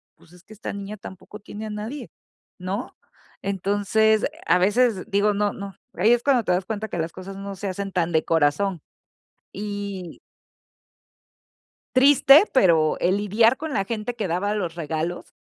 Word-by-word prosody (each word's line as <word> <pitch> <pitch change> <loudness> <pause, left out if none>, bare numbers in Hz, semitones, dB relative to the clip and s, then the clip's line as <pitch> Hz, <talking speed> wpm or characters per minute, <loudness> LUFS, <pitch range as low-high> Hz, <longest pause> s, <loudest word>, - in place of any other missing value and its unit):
pues, 165 - -23
es 180 0 -18
que 215 - -14
esta 210 - -6
niña 200 +1 -7
tampoco 190 +2 -11
tiene 210 +1 -8
a - - -6
nadie, 215 +7 -6 0.5
¿no? 195 +6 -4 0.5
Entonces, 205 +3 +1 0.2
a - - +5
veces, 210 +1 +2
digo, 205 +1 +2
no 205 0 0
no. 200 -2 -8 0.2
Ahí 205 +6 +3
es 240 - +2
cuando 265 -4 +3
te 180 - 0
das 180 +1 -1
cuenta 220 0 -4
que - - -4
las 165 +1 -2
cosas 185 +1 -9
no 200 0 -6
se 200 +2 -5
hacen 195 +1 -4
tan 175 -2 0
de 160 -1 +2
corazón. 165 +3 +1 0.7
Y 200 -3 -6 1.8
Triste, 275 +4 +7
pero 165 - +3
el 185 +2 +2
lidiar 220 +4 +3
con 315 0 -5
la 195 -6 0
gente 225 +2 -4
que 215 -5 -3
daba 190 +5 -1
los 175 -5 -3
regalos 165 +1 -4
200 Hz, 165 wpm, -23 LUFS, 180-215 Hz, 1.8 s, Triste